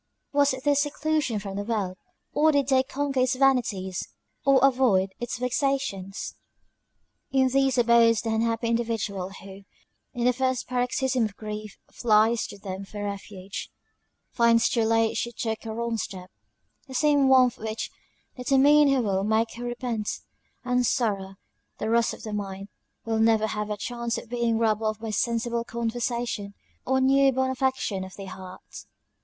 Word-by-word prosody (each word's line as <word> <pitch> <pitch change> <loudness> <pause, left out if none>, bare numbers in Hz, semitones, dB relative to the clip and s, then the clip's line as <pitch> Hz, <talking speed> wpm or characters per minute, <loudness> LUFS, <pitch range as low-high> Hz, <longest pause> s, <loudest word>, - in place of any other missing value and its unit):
Was 285 -2 +3
this 285 -1 +3
seclusion 295 -4 0
from 195 -1 -5
the 205 - -2
world? 205 -4 -2 0.4
or 310 +1 +4
did 285 -2 +1
they 260 -1 +5
conquer 275 0 -2
its 255 +1 +2
vanities 235 -9 +1 0.4
or 275 -2 +5
avoid 235 -8 +3
its 240 -1 -4
vexations? 250 -6 -2 1.0
In 265 -1 +3
these 270 0 +2
abodes 235 -1 +4
the 225 -1 -1
unhappy 230 +1 0
individual, 225 -5 -1
who, 195 0 -11 0.5
in 240 0 -1
the 250 - +4
first 260 0 -1
paroxysm 250 0 0
of 210 -2 -6
grief 215 -1 -7
flies 225 0 +3
to - - -10
them 195 -1 -6
for 205 +1 -7
refuge, 200 -1 -6 0.6
finds 235 -1 +4
too 230 -2 +1
late 225 0 +2
she 235 - -2
took 225 0 -4
a - - -3
wrong 235 0 -2
step. 185 -4 -6 0.6
The 260 - -9
same 290 -1 +4
warmth 255 -2 +5
which 220 0 -4 0.4
determined 275 +3 +5
her 270 -3 +2
will 195 -2 0
make 220 +2 +1
her 240 - -8
repent; 240 -3 -3 0.6
and 250 0 +2
sorrow, 200 -6 0 0.4
the 220 - -2
rust 235 -1 +2
of - - -15
the 215 - -5
mind, 195 -1 -5 0.4
will 225 -1 0
never 220 -1 +4
have 210 -1 -3
a 210 - -2
chance 235 +2 -3
of 230 - -8
being 235 -2 +1
rubbed 220 -1 +1
off 215 -1 -1
by 220 -1 -5
sensible 235 +1 0
conversation, 235 -3 -3 0.3
or 265 +1 +2
new 270 +1 +5
born 260 0 0
affections 260 -7 -1
of 190 - -11
the 195 - -8
heart. 185 -1 -10
230 Hz, 160 wpm, -26 LUFS, 210-260 Hz, 1.0 s, they